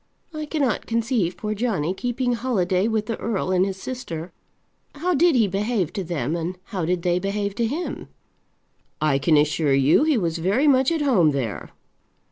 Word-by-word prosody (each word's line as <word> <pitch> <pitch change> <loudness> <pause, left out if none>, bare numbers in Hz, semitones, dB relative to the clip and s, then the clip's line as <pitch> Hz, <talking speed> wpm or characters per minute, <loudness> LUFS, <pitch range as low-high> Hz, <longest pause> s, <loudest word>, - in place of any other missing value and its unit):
I 310 -1 -5
cannot 280 -8 -1
conceive 230 -6 0
poor 215 -1 -3
Johnny 200 -7 -1
keeping 245 +4 -1
holiday 205 -6 0
with 220 -2 0
the 225 0 -3
earl 200 -4 -2
and 185 0 +3
his 190 0 -3
sister. 185 -10 -6 0.6
How 350 +5 0
did 335 0 +4
he 225 -4 +4
behave 200 -2 -1
to 195 - -3
them, 160 -4 -2
and 170 +2 -3
how 185 -5 -4
did 175 0 -1
they 175 0 +2
behave 200 +1 -2
to 235 - +1
him?" 320 +9 -4 0.9
"I 150 -3 +2
can 150 +3 +3
assure 150 -1 +2
you 140 - +4
he 310 -4 +2
was 170 -5 -1
very 200 - +2
much 265 +1 +4
at 320 -3 0
home 185 - +3
there." 125 -7 -3
200 Hz, 180 wpm, -23 LUFS, 170-245 Hz, 0.9 s, did